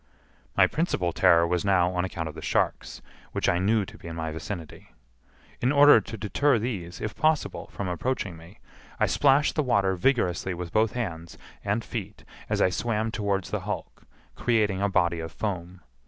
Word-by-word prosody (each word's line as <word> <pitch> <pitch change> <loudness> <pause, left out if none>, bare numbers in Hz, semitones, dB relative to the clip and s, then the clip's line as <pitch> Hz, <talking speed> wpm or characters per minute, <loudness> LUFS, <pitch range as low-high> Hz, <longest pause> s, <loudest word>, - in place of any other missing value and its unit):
My - - +7
principal 95 - -1
terror 85 +1 +5
was 85 0 0
now 90 -3 +3
on 90 -1 0
account 85 -3 -4
of 80 - -6
the - - -9
sharks, - - -1 0.3
which - - -1
I 90 - +2
knew 105 +2 +2
to - - -13
be - - -10
in 80 - -6
my 80 -1 -3
vicinity. 80 +1 -8 0.7
In 125 - +2
order 145 -4 +7
to 110 - -8
deter 120 +6 +2
these, 100 -7 -4
if 110 0 -4
possible, 155 +6 0
from 100 - -4
approaching 95 +1 -2
me, 85 +5 -14 0.4
I - - +4
splashed 145 +1 +3
the 155 - +1
water 100 -8 +2
vigorously 95 -4 +1
with 85 -1 -6
both 110 -1 +2
hands 85 -9 -5 0.3
and 105 +3 -1
feet 105 -3 -6 0.3
as - - +2
I 95 - +3
swam 110 +2 -1
towards 100 -4 -2
the - - -1
hulk, - - -6 0.3
creating 105 -5 +1
a 100 - +2
body 85 -3 +1
of 80 0 -5
foam. 90 -3 -4
100 Hz, 185 wpm, -26 LUFS, 85-115 Hz, 0.7 s, My